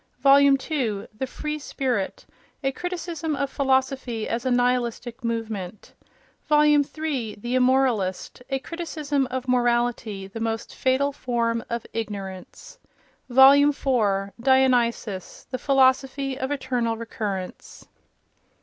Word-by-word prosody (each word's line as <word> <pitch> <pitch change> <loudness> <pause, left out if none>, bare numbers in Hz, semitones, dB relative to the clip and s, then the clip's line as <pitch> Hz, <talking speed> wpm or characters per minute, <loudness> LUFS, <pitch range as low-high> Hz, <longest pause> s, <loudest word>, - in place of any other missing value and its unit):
Vol. 275 0 +7
II. 275 -6 +1
The 265 +4 -3
Free 300 +4 -4
Spirit: 255 -8 -3 0.4
a 270 - +1
Criticism 330 -1 -4
of 280 -1 -2
Philosophy 265 -4 0
as 235 +3 -2
a - - +2
Nihilistic 245 0 0
Movement. 220 -5 -4 0.6
Vol. 300 0 +5
III. 290 -5 0
The 240 +4 -5
Immoralist: 250 -7 +1
a 270 - 0
Criticism 295 -2 -3
of 260 0 -4
Morality, 240 -5 0
the 195 +4 -8
Most 225 0 -3
Fatal 265 +2 +1
Form 235 -4 -1
of 235 -1 -3
Ignorance. 205 - -7 0.5
Vol. 265 +2 +8
IV. 250 -9 +2
Dionysus: 245 -7 +1
the 255 - -3
Philosophy 270 0 +2
of 260 0 -3
Eternal 250 -5 -1
Recurrence. 210 -5 -6
255 Hz, 115 wpm, -24 LUFS, 230-275 Hz, 0.6 s, Vol